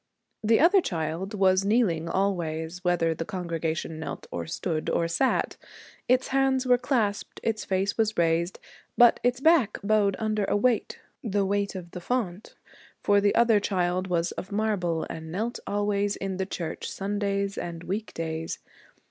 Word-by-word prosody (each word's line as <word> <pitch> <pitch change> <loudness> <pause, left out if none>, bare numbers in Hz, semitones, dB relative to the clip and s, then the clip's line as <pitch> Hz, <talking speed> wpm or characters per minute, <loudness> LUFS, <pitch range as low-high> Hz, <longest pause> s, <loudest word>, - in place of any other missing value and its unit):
The 225 +1 +4
other 365 +5 +6
child 170 - -3
was 190 -1 +3
kneeling, 195 -7 +2
always, 170 -2 -1
whether 175 -2 +2
the 165 - -4
congregation 165 -4 -3
knelt 155 -3 -6
or 85 -1 -4
stood 160 - -2
or 170 - +1
sat. 255 +11 0 0.5
Its 255 +1 +3
hands 270 -1 +2
were 250 -1 +4
clasped. 235 -6 -1
Its 220 -1 -1
face 195 +3 -1
was 220 -1 +1
raised, 170 +1 +1 0.4
but 240 -1 +7
its 245 0 +1
back 285 -8 +4
bowed 205 -2 +3
under 215 -2 0
a 205 - +1
weight 235 +1 +1 0.3
the 205 -3 0
weight 200 0 -1
of 175 -2 -7
the 180 - -7
font, 210 -3 -3 0.5
for 205 0 +4
the 205 0 +2
other 230 -2 +5
child 185 -2 0
was 170 -1 0
of 190 - -7
marble 200 -6 0
and 160 0 -7
knelt 225 +7 -2
always 205 0 0
in 195 -1 -4
the 190 0 -2
church, 170 -4 -4
Sundays 200 0 -2
and 170 -1 -5
week 210 +5 -3
days. 160 0 -3
195 Hz, 160 wpm, -27 LUFS, 170-215 Hz, 0.5 s, but